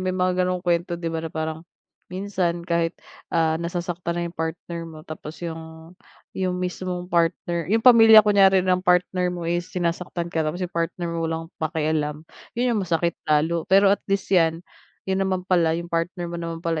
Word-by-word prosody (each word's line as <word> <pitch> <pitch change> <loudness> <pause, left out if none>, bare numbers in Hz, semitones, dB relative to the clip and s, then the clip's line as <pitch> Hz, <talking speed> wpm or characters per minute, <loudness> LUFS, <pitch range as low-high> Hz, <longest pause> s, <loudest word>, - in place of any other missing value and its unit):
May 185 0 -2
mga 185 0 +2
ganong 180 0 -1
kuwento 175 0 0
'di 170 -1 -4
ba 160 - -2
na 165 - -5
parang 160 0 -4 0.5
minsan 180 -2 -2
kahit, 170 -1 0 0.3
ah, 160 -1 +1
nasasaktan 170 0 -3
na 175 - -1
'yong 170 - -5
partner 165 +1 -4
mo 155 -1 -12
tapos 155 0 -8
yung 160 0 -8 0.4
yung 185 -1 -1
mismong 180 0 -3
partner 170 0 0
yung 225 +3 +1
pamilya 225 -3 +9
kunyari 195 -2 +5
ng 185 -1 +2
partner 180 0 +2
mo 175 -1 -4
is 175 +1 -1
sinasaktan 175 0 -3
ka 165 - 0
tapos 165 +4 -3
yung 180 - -7
partner 170 +1 -2
mo 170 - -3
walang 165 +1 -5
pakialam, 155 -1 -1 0.3
'yon 245 0 +1
ang 215 - 0
masakit 170 -2 0 0.2
lalo. 160 +2 +1
Pero 195 +1 +6
at 205 - 0
least 195 0 -1
'yan, 165 -1 +3 0.4
'yon 190 0 -1
naman 190 -1 -1
pala, 170 -3 +2
'yong 170 0 -7
partner 175 +2 -1
mo 170 - -4
naman 165 0 -6
pala, 165 -1 0
170 Hz, 185 wpm, -23 LUFS, 165-185 Hz, 0.5 s, pamilya